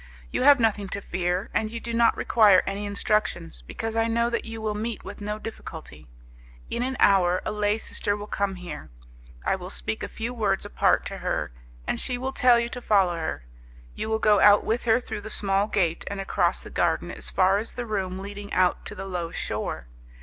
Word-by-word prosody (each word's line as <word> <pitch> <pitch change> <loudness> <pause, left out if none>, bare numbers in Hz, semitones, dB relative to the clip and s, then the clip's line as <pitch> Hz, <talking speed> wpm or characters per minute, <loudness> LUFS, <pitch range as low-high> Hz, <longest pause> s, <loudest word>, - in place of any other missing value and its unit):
You - - -1
have 280 +1 +7
nothing 210 -4 +1
to 200 - -3
fear 180 0 -2
and 220 -1 0
you 230 - -4
do 235 0 -5
not 230 0 +4
require 210 -5 +5
any 205 +1 -3
instructions, 200 - -1
because 225 - -5
I 225 0 +2
know 235 +1 +1
that 235 - -1
you 225 0 -6
will 215 -1 -2
meet 220 +2 -4
with 205 - -8
no 210 +1 -3
difficulty. 225 +1 -9 0.6
In - - -1
an 260 +1 -2
hour, 185 -2 +4
a - - -1
lay 210 0 +1
sister 205 -2 -1
will 205 - -6
come 200 -2 -1
here, 175 -4 -8 0.6
I - - +2
will - - -7
speak - - -3
a - - -3
few 230 +2 -5
words 205 -5 0
apart - - +2
to - - -5
her, - - -2 0.3
and - - -1
she 250 - -1
will 260 +2 -3
tell 250 -2 +5
you 235 - -1
to 245 - -7
follow 195 -6 +3
her. 160 - -4 0.5
You 220 - -4
will 220 - +2
go 210 -2 +4
out 205 +1 +7
with 230 +2 -1
her 225 0 +4
through 225 - -6
the 215 - -8
small 200 -1 +1
gate 175 -6 0
and 200 - -4
across 195 - 0
the - - -10
garden - - 0
as - - -4
far 190 +1 +3
as 225 - -6
the 245 - -4
room 190 -4 -2
leading 200 +1 -7
out 185 -1 +2
to - - -7
the 195 - -6
low 180 -3 -3
shore. - - -3
205 Hz, 215 wpm, -26 LUFS, 190-225 Hz, 0.6 s, have